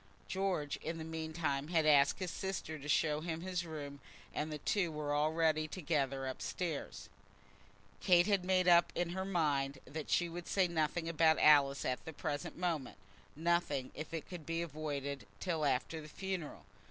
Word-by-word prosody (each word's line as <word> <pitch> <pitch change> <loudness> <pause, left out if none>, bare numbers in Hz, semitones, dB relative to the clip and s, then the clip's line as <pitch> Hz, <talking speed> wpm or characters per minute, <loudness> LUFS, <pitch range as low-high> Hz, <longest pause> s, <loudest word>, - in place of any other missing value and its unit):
George, 185 -7 -1
in 165 +1 -4
the 160 - -5
meantime, 160 -3 -2
had 165 -2 +2
asked 145 -2 +5
his 185 -2 -3
sister 175 -5 -4
to 145 +2 -8
show 150 0 +2
him 165 0 -3
his 180 -1 -2
room, 145 -3 -6 0.3
and 155 +1 -2
the 150 - -3
two 175 +3 0
were 150 -1 -2
already 155 +1 +2
together 145 -6 -1
up 130 -1 -5
stairs. 170 -5 -4 0.9
Kate 175 -2 +5
had 200 -3 +2
made 185 0 +2
up 175 -1 +6
her 175 +2 -1
mind 145 -7 0
that 155 0 -6
she 175 - +3
would 170 +1 -7
say 190 -2 +3
nothing 165 0 0
about 160 -1 +4
Alice 140 -2 +5
at 125 - -1
the 160 - -7
present 145 -1 -4
moment, 165 -6 -2 0.4
nothing, 155 -5 0
if 155 - -7
it 165 -3 -4
could 175 -4 -7
be 165 +2 -2
avoided, 140 -6 -4
till 165 -4 -1
after 140 +4 0
the 155 - -10
funeral. 190 -2 -5
160 Hz, 170 wpm, -35 LUFS, 145-175 Hz, 0.9 s, up